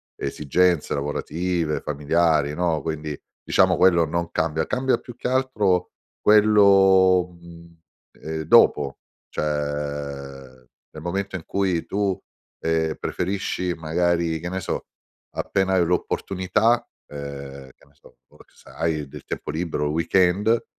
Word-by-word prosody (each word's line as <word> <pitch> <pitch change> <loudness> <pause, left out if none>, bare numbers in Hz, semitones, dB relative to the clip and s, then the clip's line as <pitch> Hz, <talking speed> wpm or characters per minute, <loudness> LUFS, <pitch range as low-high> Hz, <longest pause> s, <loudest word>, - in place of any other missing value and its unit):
esigenze 75 +4 +1
lavorative, 80 +3 -2
familiari, 75 0 +1
no, 85 -3 0
quindi 75 -1 -4 0.3
diciamo - - +3
quello 85 -3 +5
non 85 +1 -3
cambia. 80 0 0
Cambia 130 +1 +1
più 120 - -12
che - - -4
altro 110 -9 +1 0.3
quello, 95 -3 +5
mhmm, 85 -1 -15 0.4
ehm, 80 0 -4
dopo 70 -2 +4 0.3
cioè 70 -3 -4 0.3
nel 75 0 -10
momento 95 +2 -3
in 90 - -5
cui 95 -4 0
tu, 100 -2 -1 0.5
ehm, 80 -1 0
preferisci 90 -1 -2
magari, 85 0 0
che 85 - -6
ne 95 +1 -3
so, - - -3 0.5
appena 95 -1 0
hai 90 -2 +3
l'opportunità, 95 +6 0 0.2
ehm, 70 -2 -8
che - - -24
ne 70 - -27
so, 75 - -21
o - - -22
se - - -20
hai 80 -3 -2
del - - -11
tempo - - -5
libero 80 -1 -2
o - - +1
il 75 - -2
weekend 95 +7 +2
85 Hz, 130 wpm, -23 LUFS, 75-95 Hz, 0.5 s, quello